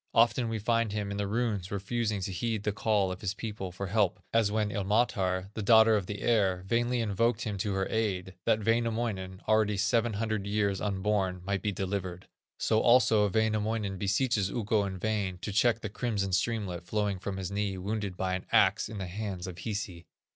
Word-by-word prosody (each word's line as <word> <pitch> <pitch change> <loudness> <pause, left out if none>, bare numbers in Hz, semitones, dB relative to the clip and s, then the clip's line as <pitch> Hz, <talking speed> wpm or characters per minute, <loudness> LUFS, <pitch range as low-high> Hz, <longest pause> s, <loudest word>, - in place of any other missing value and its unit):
Often 120 +1 +4
we 115 - -2
find 115 0 +1
him, 105 -1 -2
in 100 - -3
the 100 -1 -1
runes, 105 -4 -1
refusing 105 +1 -2
to 95 - -3
heed 110 +3 -2
the 105 - +1
call 105 -2 +1
of 90 - -6
his 100 -1 -2
people 105 -5 -5
for 95 +2 -5
help, 95 -1 +1
as 115 -3 +3
when 105 -1 0
Ilmatar, 95 -2 0
the 110 - -4
daughter 110 +1 +6
of 100 -4 -1
the 105 - -5
air, 95 -6 +2
vainly 120 +3 +1
invoked 115 +2 +1
him 105 -3 -3
to 100 +1 -1
her 95 0 0
aid, 95 -5 -1
that 110 -1 +2
Wainamoinen, 115 -5 -1
already 110 -2 +3
seven 115 +3 +2
hundred 110 -1 -2
years 100 -1 0
unborn, 95 -2 -1
might 100 0 -1
be 105 - 0
delivered. 95 -2 -4 0.3
So 110 - +2
also 115 -4 +5
Wainamoinen 110 -1 0
beseeches 100 0 +1
Ukko 110 -2 0
in 95 -1 -4
vain 100 -2 -1
to 105 - -5
check 115 +2 +3
the - - -3
crimson 100 -3 -2
streamlet 95 -2 -1
flowing 100 +1 -1
from 95 0 -4
his 95 -1 -4
knee 100 -1 -1
wounded 100 0 -3
by 95 -1 -1
an 90 - -4
axe 95 +2 +4
in 110 - -7
the 95 - -3
hands 95 0 -5
of 90 -2 -7
Hisi. 95 -4 -5
105 Hz, 195 wpm, -29 LUFS, 95-110 Hz, 0.3 s, daughter